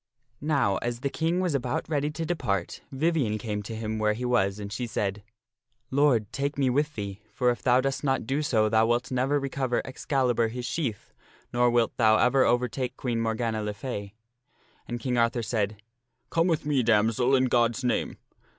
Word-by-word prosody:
Now, 140 Hz, -10 st, +1 dB
as 120 Hz, 0 st, -3 dB
the 140 Hz, -1 st, -1 dB
King 165 Hz, +3 st, 0 dB
was 180 Hz, -4 st, 0 dB
about 125 Hz, -3 st, -1 dB
ready 145 Hz, -1 st, 0 dB
to 165 Hz, +2 st, -4 dB
depart, 100 Hz, -, -2 dB
Vivien 135 Hz, -6 st, +1 dB
came 105 Hz, -1 st, -3 dB
to 110 Hz, +2 st, -7 dB
him 110 Hz, 0 st, -3 dB
where 105 Hz, 0 st, +2 dB
he 125 Hz, +4 st, -4 dB
was, 100 Hz, -5 st, +1 dB
and 100 Hz, 0 st, -6 dB
she 120 Hz, +2 st, -3 dB
said, 100 Hz, -2 st, -2 dB, 0.3 s
" 125 Hz, -, -65 dB, 0.3 s
Lord, 130 Hz, -7 st, +2 dB
take 140 Hz, +1 st, -2 dB
me 135 Hz, -2 st, +2 dB
with 150 Hz, +3 st, 0 dB
thee, 100 Hz, -1 st, -5 dB
for 125 Hz, -1 st, +2 dB
if 120 Hz, -, -5 dB
thou 125 Hz, +1 st, +4 dB
dost 135 Hz, +2 st, -2 dB
not 135 Hz, -4 st, 0 dB
do 135 Hz, +5 st, 0 dB
so 110 Hz, -7 st, +2 dB
thou 110 Hz, +1 st, +3 dB
wilt 120 Hz, +2 st, 0 dB
never 130 Hz, +3 st, +1 dB
recover 135 Hz, -2 st, -1 dB
Excalibur 130 Hz, -3 st, 0 dB
his 120 Hz, +2 st, -5 dB
sheath, 125 Hz, -12 st, -3 dB, 0.4 s
nor 120 Hz, 0 st, +4 dB
wilt 120 Hz, -1 st, +1 dB
thou 110 Hz, -1 st, +5 dB
ever 130 Hz, +1 st, +4 dB
overtake 125 Hz, +1 st, 0 dB
Queen 120 Hz, -3 st, -1 dB
Morgana 115 Hz, -1 st, -1 dB
le 105 Hz, 0 st, -3 dB
Fay." 105 Hz, -5 st, -6 dB, 0.7 s
And 120 Hz, 0 st, -4 dB
King 125 Hz, -1 st, -1 dB
Arthur 115 Hz, 0 st, +1 dB
said, 105 Hz, -2 st, -2 dB, 0.2 s
" 120 Hz, -, -50 dB
Come 165 Hz, +1 st, +2 dB
with 160 Hz, -4 st, 0 dB
me, 145 Hz, -3 st, +2 dB
damsel, 115 Hz, +3 st, +3 dB
in 130 Hz, 0 st, +3 dB
God's 120 Hz, 0 st, +2 dB
name." 125 Hz, -, -1 dB
120 Hz, 195 wpm, -27 LUFS, 110-135 Hz, 0.7 s, thou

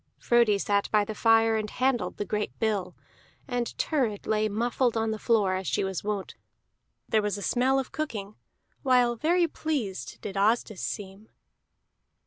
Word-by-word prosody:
Frodi 235 Hz, -4 st, +3 dB
sat 200 Hz, 0 st, 0 dB
by 210 Hz, -1 st, +3 dB
the 215 Hz, -, -5 dB
fire 225 Hz, +1 st, +4 dB
and 215 Hz, -1 st, -2 dB
handled 255 Hz, 0 st, 0 dB
the 205 Hz, -, -2 dB
great 210 Hz, 0 st, -3 dB
bill, 200 Hz, -5 st, -1 dB, 0.5 s
and 245 Hz, -3 st, -1 dB
Thurid 245 Hz, -10 st, -1 dB
lay 215 Hz, 0 st, +1 dB
muffled 235 Hz, +2 st, 0 dB
on 225 Hz, 0 st, 0 dB
the 220 Hz, -, -4 dB
floor 210 Hz, -5 st, +2 dB
as 185 Hz, 0 st, -3 dB
she -, -, 0 dB
was 190 Hz, -2 st, -3 dB
wont; 205 Hz, -2 st, -3 dB, 0.7 s
there 220 Hz, -, +2 dB
was 205 Hz, 0 st, -1 dB
a 200 Hz, -, -6 dB
smell 260 Hz, +5 st, +2 dB
of 265 Hz, -1 st, -2 dB
cooking, 215 Hz, -10 st, -4 dB, 0.5 s
while 250 Hz, -3 st, +3 dB
very 340 Hz, +7 st, +2 dB
pleased 280 Hz, -, -3 dB
did 200 Hz, -, -6 dB
Asdis 215 Hz, 0 st, +1 dB
seem. 200 Hz, 0 st, -6 dB
220 Hz, 160 wpm, -27 LUFS, 205-245 Hz, 0.7 s, fire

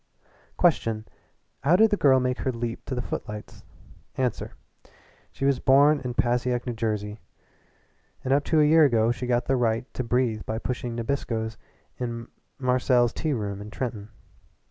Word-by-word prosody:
Question 115 Hz, -11 st, +2 dB, 0.5 s
how 155 Hz, +6 st, +3 dB
did 220 Hz, +3 st, +5 dB
the -, -, +4 dB
girl 135 Hz, -8 st, +4 dB
make 125 Hz, 0 st, -1 dB
her 130 Hz, -, -1 dB
leap 115 Hz, -1 st, -4 dB
to 130 Hz, -, -4 dB
the 125 Hz, -, -2 dB
footlights? 105 Hz, -2 st, -7 dB, 0.5 s
Answer 125 Hz, -4 st, -2 dB, 0.8 s
she 135 Hz, -, -4 dB
was 140 Hz, -1 st, +2 dB
born 145 Hz, +3 st, +5 dB
in 125 Hz, -2 st, -5 dB
Passaic, 120 Hz, 0 st, 0 dB
New 125 Hz, -, -2 dB
Jersey, 105 Hz, -2 st, -3 dB, 1.0 s
and 130 Hz, -, +1 dB
up 145 Hz, +1 st, +3 dB
to 160 Hz, -, +2 dB
a 150 Hz, -, +6 dB
year 160 Hz, +1 st, +6 dB
ago 115 Hz, -5 st, +3 dB
she 125 Hz, +1 st, -4 dB
got 120 Hz, -1 st, +1 dB
the 135 Hz, -, +1 dB
right 115 Hz, 0 st, +1 dB
to 125 Hz, -, -3 dB
breathe 115 Hz, -2 st, 0 dB
by 110 Hz, -, -3 dB
pushing 120 Hz, 0 st, -4 dB
Nabiscoes 115 Hz, -2 st, -2 dB, 0.4 s
in 115 Hz, -1 st, -4 dB, 0.3 s
Marcel's 125 Hz, -2 st, +2 dB
tea 155 Hz, -2 st, -1 dB
room 100 Hz, -4 st, -3 dB
in 105 Hz, -, -8 dB
Trenton. 110 Hz, -3 st, -5 dB
125 Hz, 165 wpm, -26 LUFS, 115-135 Hz, 1.0 s, a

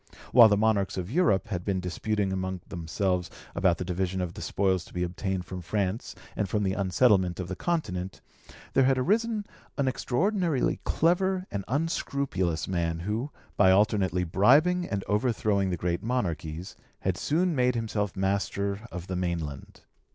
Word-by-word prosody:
While 115 Hz, -3 st, +9 dB
the 105 Hz, -, +3 dB
monarchs 105 Hz, -3 st, +1 dB
of 90 Hz, +2 st, -4 dB
Europe 130 Hz, -, +2 dB
had 90 Hz, -4 st, -3 dB
been 95 Hz, -1 st, 0 dB
disputing 95 Hz, +2 st, -1 dB
among 95 Hz, -1 st, -3 dB
themselves 90 Hz, +1 st, -1 dB, 0.2 s
about 90 Hz, -3 st, +2 dB
the 90 Hz, -, -4 dB
division 95 Hz, +1 st, -2 dB
of 90 Hz, -2 st, -3 dB
the -, -, -8 dB
spoils 95 Hz, -3 st, 0 dB
to -, -, -16 dB
be 90 Hz, -, 0 dB
obtained 90 Hz, +1 st, -3 dB
from 90 Hz, +1 st, -6 dB
France 100 Hz, +4 st, -2 dB, 0.2 s
and 100 Hz, -3 st, -1 dB
from 105 Hz, +2 st, 0 dB
the 95 Hz, -1 st, +1 dB
unsettlement 95 Hz, -2 st, +2 dB
of 90 Hz, -, -3 dB
the 95 Hz, -, -4 dB
Continent, 95 Hz, -, -2 dB, 0.5 s
there 135 Hz, -, +4 dB
had 135 Hz, 0 st, +3 dB
arisen 215 Hz, -, +1 dB, 0.3 s
an 140 Hz, -2 st, +1 dB
extraordinarily 165 Hz, -, 0 dB
clever 185 Hz, +3 st, +2 dB
and 100 Hz, -1 st, -3 dB
unscrupulous 135 Hz, -, -1 dB
man 85 Hz, -3 st, -1 dB
who, 110 Hz, -, -2 dB, 0.3 s
by 95 Hz, -2 st, +6 dB
alternately 95 Hz, -3 st, +3 dB
bribing 145 Hz, -, +4 dB
and 100 Hz, -2 st, -2 dB
overthrowing 105 Hz, -3 st, +1 dB
the 90 Hz, -, -1 dB
great 85 Hz, +1 st, -1 dB
monarchies, 90 Hz, -7 st, -3 dB, 0.3 s
had 95 Hz, -2 st, 0 dB
soon 170 Hz, -, +1 dB
made 125 Hz, -1 st, +2 dB
himself 105 Hz, -4 st, -2 dB
master 100 Hz, +1 st, -1 dB
of 90 Hz, -1 st, -6 dB
the 95 Hz, -, -4 dB
mainland. 85 Hz, -6 st, -4 dB
100 Hz, 160 wpm, -28 LUFS, 90-125 Hz, 0.5 s, While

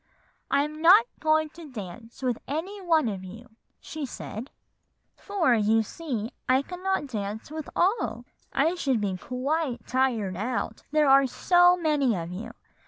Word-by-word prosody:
"'I'm 300 Hz, +2 st, 0 dB
not 375 Hz, +7 st, +8 dB
going 310 Hz, 0 st, +2 dB
to 320 Hz, 0 st, -12 dB
dance 225 Hz, +2 st, -9 dB
with 250 Hz, -3 st, 0 dB
any 340 Hz, +9 st, -4 dB
of 310 Hz, -, +1 dB
you,' 225 Hz, +6 st, -11 dB, 0.3 s
she 310 Hz, -1 st, -7 dB
said; 245 Hz, -1 st, -6 dB, 0.7 s
'for, 385 Hz, -, +1 dB
you 220 Hz, 0 st, +3 dB
see, 240 Hz, -3 st, -5 dB, 0.2 s
I 260 Hz, +2 st, +4 dB
cannot 365 Hz, +1 st, -2 dB
dance 215 Hz, -1 st, -5 dB
with 310 Hz, -1 st, -6 dB
all; 390 Hz, +6 st, +1 dB, 0.3 s
I 330 Hz, -, +2 dB
should 275 Hz, -9 st, 0 dB
be 200 Hz, -3 st, -1 dB
quite 260 Hz, -, -2 dB
tired 235 Hz, -8 st, 0 dB
out, 225 Hz, +1 st, -3 dB
there 305 Hz, 0 st, +3 dB
are 275 Hz, 0 st, +6 dB
so 355 Hz, +6 st, +4 dB
many 295 Hz, -8 st, +2 dB
of 170 Hz, -1 st, -5 dB
you. 225 Hz, +6 st, -7 dB
270 Hz, 145 wpm, -27 LUFS, 225-315 Hz, 0.7 s, not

